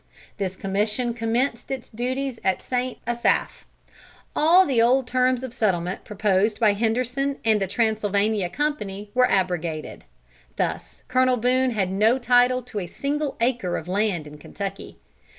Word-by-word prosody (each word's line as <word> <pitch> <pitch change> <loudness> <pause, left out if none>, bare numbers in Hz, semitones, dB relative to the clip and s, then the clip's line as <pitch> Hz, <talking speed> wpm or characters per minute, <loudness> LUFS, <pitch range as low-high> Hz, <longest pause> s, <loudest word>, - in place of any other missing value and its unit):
This 190 -2 -2
commission 210 +6 -1
commenced 235 +2 -1
its 265 -3 -4
duties 255 +2 -3
at 190 -1 0
St. 250 0 -2
Asaph. 240 +1 0 0.7
All 345 +5 +6
the 255 -8 +2
old 255 +3 +3
terms 255 0 +1
of 255 -3 -6
settlement 185 -5 -1
proposed 210 0 +1
by 215 -3 +4
Henderson 250 +6 -1
and 215 -2 +3
the 195 - 0
Transylvania 210 -2 0
Company 210 -7 -3
were 250 0 +4
abrogated. 175 -5 -1 0.5
Thus - - -3
Colonel 255 0 +3
Boone 255 +2 +2
had 200 -6 -1
no 215 +6 +3
title 250 0 +3
to 220 -3 -5
a 180 - -5
single 285 - -3
acre 235 -7 0
of 160 - -7
land 190 -4 0
in 150 0 -11
Kentucky. 195 +5 -7
230 Hz, 145 wpm, -24 LUFS, 195-255 Hz, 0.7 s, All